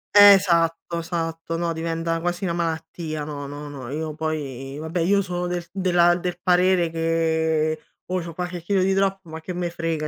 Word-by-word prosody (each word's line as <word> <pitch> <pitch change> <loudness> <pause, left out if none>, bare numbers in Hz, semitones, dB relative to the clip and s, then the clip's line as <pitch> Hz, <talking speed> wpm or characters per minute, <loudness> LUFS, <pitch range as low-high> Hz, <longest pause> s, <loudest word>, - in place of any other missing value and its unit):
Esatto, 175 -5 +6
esatto, 165 -1 -3
no, 170 0 -1
diventa 165 0 -2
quasi 175 +2 -2
una 175 -3 0
malattia, 160 -2 -3
no, 145 -1 -5
no, 145 +1 -7
no, 135 -4 -8
io 155 +1 -3
poi 140 -4 -4
vabbè 160 +3 -3
io 200 +4 +3
sono 180 -2 -3
del 175 0 -2
della 175 -2 +3
del 180 0 -3
parere 180 -1 +3
che, 160 -1 +1 0.3
oh, 185 0 -1
c'ho 165 0 -7
qualche 180 +1 -4
chilo 190 +3 +1
di 190 +1 +2
troppo, 195 -2 0
ma 160 0 -7
che 180 +3 -5
me 175 0 -2
frega, 165 -2 -2
165 Hz, 180 wpm, -23 LUFS, 160-180 Hz, 0.3 s, Esatto